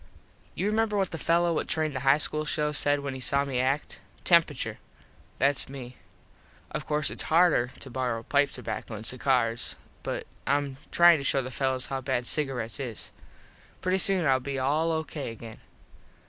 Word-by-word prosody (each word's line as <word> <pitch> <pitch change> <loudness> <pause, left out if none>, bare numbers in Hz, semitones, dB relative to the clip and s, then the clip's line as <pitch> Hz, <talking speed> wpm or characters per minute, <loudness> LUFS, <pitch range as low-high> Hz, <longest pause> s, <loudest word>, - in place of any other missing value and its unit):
You 185 - -2
remember 215 0 +1
what 195 -2 0
the 165 - -5
fello 170 +1 +2
what - - -1
trained 155 -3 -1
the - - -1
high 135 +2 +4
school 155 0 -1
show 150 0 0
said 145 0 +1
when 140 -1 -4
he 130 - -6
saw 140 +2 +2
me 130 -3 -2
act. 135 +3 -1 0.2
Temperature. 165 -5 +2 0.6
Thats 140 -1 +1
me. 130 -2 -8 0.8
Of - - -4
course 150 -1 +1
its - - -2
harder 160 -7 +4
to 135 - -8
borrow 120 -3 -2
pipe 140 +2 +2
tobacco 115 -2 -6
and 110 +1 -8
cigars 125 -2 +1 0.3
but - - -4 0.2
Im 140 -1 0
tryin 170 -2 +6
to - - -5
show 135 0 +1
the 130 - -6
fellos 130 0 -1
how 135 -1 -3
bad 125 -1 -1
cigarets 135 -4 -1
is. 120 -5 -4 0.7
Pretty 185 +1 +1
soon 190 -3 +4
Ill 135 -2 +4
be 135 +1 -4
all 150 +5 +1
O.K. 160 -3 -3
again. 115 -1 -10
140 Hz, 175 wpm, -27 LUFS, 130-155 Hz, 0.8 s, tryin